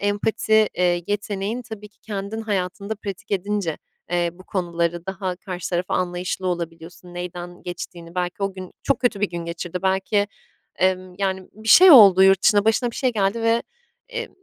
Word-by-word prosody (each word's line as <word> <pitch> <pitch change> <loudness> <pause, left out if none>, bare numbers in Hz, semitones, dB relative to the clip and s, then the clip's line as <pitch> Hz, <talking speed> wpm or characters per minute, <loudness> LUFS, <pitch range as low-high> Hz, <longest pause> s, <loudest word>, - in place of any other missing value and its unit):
empati, 215 +1 +2
eee, 175 -1 +1
yeteneğim, 205 +3 -2
tabii 220 -3 -9
ki 210 - -38
kendim 205 +1 -5
hayatında 200 0 -2
pratik 200 -3 -8
edince, 200 -4 -1 0.3
eee, 175 -1 +1
bu 185 +2 -16
konuları 170 -2 -2
daha 190 -2 -3
karşı 185 -2 -6
taraf 175 +1 0
anlayışlı 180 +1 -2
olabiliyorsun, 170 0 -5
neyden 175 0 -7
geçtiğini. 175 -1 -8
Belki 180 +2 -3
o 195 0 0
gün 185 -1 -9
çok 275 - +1
kötü 235 -5 +1
bir 205 - +1
gün 170 -1 -5
geçirdi. 170 +1 -5
Belki, 195 +2 +1 0.5
emm, 185 0 0
yani, 190 -1 -2
bir 220 +2 -9
şey 370 +9 +9
oldu 200 - +9
yurt 195 -1 +5
dışında, 205 -1 +4
başına 225 +2 +2
bir - - -10
şey 255 -2 +1
geldi 205 +2 0
ve, 230 +1 +2 0.5
eee, 470 0 -4
190 Hz, 170 wpm, -22 LUFS, 175-210 Hz, 0.5 s, şey